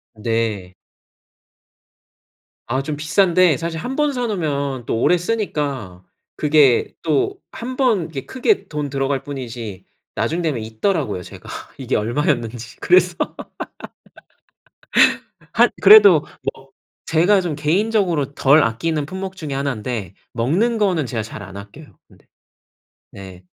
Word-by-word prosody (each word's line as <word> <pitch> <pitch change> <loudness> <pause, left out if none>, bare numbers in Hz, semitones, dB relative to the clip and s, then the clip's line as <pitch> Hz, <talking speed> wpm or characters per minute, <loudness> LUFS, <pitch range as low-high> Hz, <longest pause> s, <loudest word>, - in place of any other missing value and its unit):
네. 110 -4 -2 2.0
아 130 +2 0
좀 145 +1 -4
비싼데 175 +1 +3
사실 165 0 -4
1 255 +9 -4
번 295 -1 +1
사 250 -2 -2
놓으면 140 - -2
또 115 - -1
오래 180 - +4
쓰니까 145 - -3 0.3
그게 145 -5 +3
또 155 -4 0
1 255 +2 -6
번 220 - +2
이게 135 -4 -6
크게 265 - 0
돈 150 -2 -4
들어갈 135 0 -1
뿐이지 115 -8 -7 0.3
나중 170 +2 -1
되면 145 -9 -1
잊더라고요 110 - -1
제가 - - -12 0.3
이게 - - -2
얼마였는지. 120 -1 -1
그래서 180 0 +4 2.4
한 - - +4
그래도 425 -1 +8 0.3
뭐 - - -18 0.4
제가 180 +5 +3
좀 175 -5 -3
개인적으로 170 -2 0
덜 145 +3 +5
아끼는 145 +6 -1
품목 190 +2 -6
중에 155 -5 -6
하난데 120 -7 -3 0.2
먹는 180 - +1
거는 180 - +1
제가 115 -4 -3
잘 110 - -8
안 95 +1 -10
아껴요, 105 +10 -12
근데. - - -23 0.9
네. 95 -2 -11
150 Hz, 235 characters per minute, -20 LUFS, 115-180 Hz, 2.4 s, 그래도